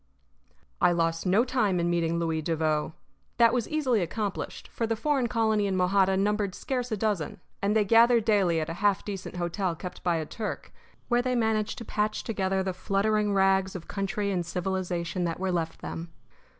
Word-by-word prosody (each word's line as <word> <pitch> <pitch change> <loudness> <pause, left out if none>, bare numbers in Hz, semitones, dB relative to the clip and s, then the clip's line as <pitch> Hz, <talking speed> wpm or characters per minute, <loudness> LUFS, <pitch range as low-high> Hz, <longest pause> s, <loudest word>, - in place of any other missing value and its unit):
I 175 0 +5
lost 165 +1 0
no 205 +7 +4
time 215 -8 +1
in 170 - +1
meeting 170 -1 +1
Louis 165 -1 -1
Devoe. 155 -1 -1 0.4
That 235 -1 +5
was 245 -3 -1
easily 265 -8 +1
accomplished, 200 +3 -4
for 230 - -2
the 225 - 0
foreign 270 +1 +1
colony 220 -3 +1
in 190 - -1
Mojada 190 +1 +3
numbered 205 -1 0
scarce 250 -2 -3
a 215 - 0
dozen; 205 -8 -1 0.2
and 200 +2 +1
they 215 -1 +3
gathered 230 +1 +5
daily 195 -7 +3
at 155 - -2
a 165 - -4
half 200 -1 +2
decent 195 -3 -6
hotel 175 +1 -1
kept 180 +2 -8
by 175 -1 +2
a 160 -1 -2
Turk, 215 +6 -6 0.3
where 240 0 +3
they 250 0 -1
managed 220 -2 0
to 230 - -7
patch 210 +1 -1
together 190 -3 -1
the 190 -1 -2
fluttering 205 +2 +1
rags 190 0 +3
of 175 -2 -7
country 200 +1 -2
and 180 -2 0
civilization 180 0 -2
that 165 0 -3
were 190 0 -1
left 165 -2 -2
them. 165 0 -6
195 Hz, 190 wpm, -27 LUFS, 175-220 Hz, 0.4 s, I